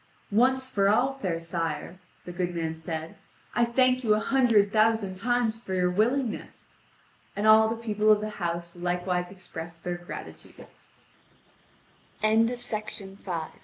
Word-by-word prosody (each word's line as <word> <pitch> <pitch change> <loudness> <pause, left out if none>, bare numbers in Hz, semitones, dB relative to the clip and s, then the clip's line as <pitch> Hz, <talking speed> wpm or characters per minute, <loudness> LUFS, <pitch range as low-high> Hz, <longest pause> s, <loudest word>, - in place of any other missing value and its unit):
"Once 260 +5 +3
for 200 -6 +2
all, 250 +6 +3
fair 175 -8 -2
sire," 165 +1 -4 0.3
the 180 - -6
good 175 0 -3
man 160 -1 -2
said, 160 0 -6 0.4
"I 240 - +3
thank 255 +1 +2
you 215 -2 +4
a - - +1
hundred 225 -5 +3
thousand 220 -3 +3
times 230 +2 0
for 190 -5 -4
your 180 -1 +2
willingness." 230 +5 -1 0.7
And 205 +2 -1
all 220 0 +7
the 225 - -1
people 215 -2 +1
of 210 - +5
the 215 0 -4
house 170 0 -3
likewise 180 0 -1
expressed 170 -3 -9
their 175 0 -3
gratitude. 175 0 -10 1.6
(Vv. 225 +2 +4
205 Hz, 135 wpm, -27 LUFS, 175-225 Hz, 1.6 s, all